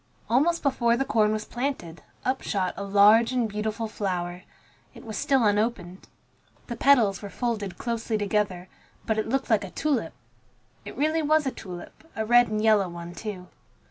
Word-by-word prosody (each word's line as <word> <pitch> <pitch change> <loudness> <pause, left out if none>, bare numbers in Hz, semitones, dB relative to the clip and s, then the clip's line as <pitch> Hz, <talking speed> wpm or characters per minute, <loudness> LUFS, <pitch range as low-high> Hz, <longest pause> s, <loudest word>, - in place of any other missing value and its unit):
Almost 320 +8 +2
before 240 -4 +2
the 270 - 0
corn 215 -2 +2
was 215 0 -2
planted, 240 -11 -4 0.2
up 260 +1 0
shot 185 -3 -1
a 200 - -5
large 205 +4 +5
and 250 -3 +1
beautiful 215 +2 -3
flower. 180 -4 -3 0.5
It - - -12
was 220 -2 -6
still 270 -3 +2
unopened. 205 -3 -1 0.6
The 235 - -5
petals 235 -7 +3
were 205 - -7
folded 210 -6 -3
closely 230 -1 -2
together, 200 -3 -1 0.4
but 220 -1 0
it 215 - -2
looked 270 0 -1
like 215 -2 +3
a 195 - -6
tulip. 260 - -1 0.7
It - - -9
really 310 +3 +1
was 310 0 +2
a 265 - 0
tulip, 185 - -10
a 220 - -2
red 240 +1 +5
and 215 0 -2
yellow 210 -4 +4
one, 170 0 -8
too. 185 0 -7
220 Hz, 175 wpm, -26 LUFS, 200-245 Hz, 0.7 s, large